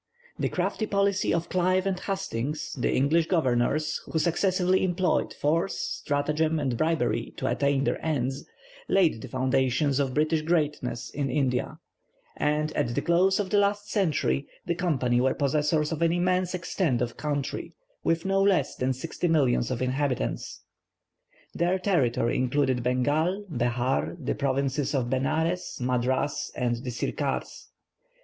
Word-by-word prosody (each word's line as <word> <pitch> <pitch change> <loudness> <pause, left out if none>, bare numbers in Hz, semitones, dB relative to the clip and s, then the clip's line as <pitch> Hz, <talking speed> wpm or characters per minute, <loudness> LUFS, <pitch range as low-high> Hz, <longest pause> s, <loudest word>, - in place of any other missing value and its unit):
The - - 0
crafty 215 - -1
policy 200 -1 +1
of 170 0 0
Clive 185 +1 +1
and 190 -2 -1
Hastings, 155 - -3
the 125 - 0
English 155 +5 +2
Governors, 155 -1 +1
who - - 0
successively 180 +2 +2
employed 180 0 +1
force, 165 +6 0
stratagem, 150 +2 -1
and 135 -4 -1
bribery, 160 +5 0
to - - -3
attain 140 -1 +1
their - - -1
ends, 135 -3 -1 0.4
laid 170 -12 +3
the - - -7
foundation 130 +2 +1
of 135 -2 -2
British 155 +1 +2
greatness 150 -7 -1
in 140 -2 -2
India, 135 +1 0 0.6
and, 150 +1 0
at 120 0 0
the - - +1
close 185 +3 +3
of 195 -2 -2
the 205 - +4
last 205 +1 0
century, 160 -7 +1 0.2
the 170 - 0
Company 130 -9 +1
were 130 +1 +2
possessors 150 +2 +1
of 160 0 -3
an 165 -1 +3
immense 180 +1 +1
extent 170 -7 0
of 120 - -4
country, 145 -2 -3 0.3
with 165 +1 0
no 195 0 +2
less 190 -8 +2
than 130 +1 0
sixty 160 +6 -3
millions 135 -7 +2
of 130 0 -2
inhabitants. 130 - -2 0.9
Their 175 +2 +1
territory 135 - +1
included 130 0 +1
Bengal, 150 - 0
Behar, 120 - 0
the - - -2
provinces 140 +1 -1
of 125 -2 -1
Benares, 160 +7 -1
Madras, 125 +3 0
and 120 -1 0
the 125 +2 -6
Sircars. 120 - -3
150 Hz, 145 wpm, -27 LUFS, 130-175 Hz, 0.9 s, the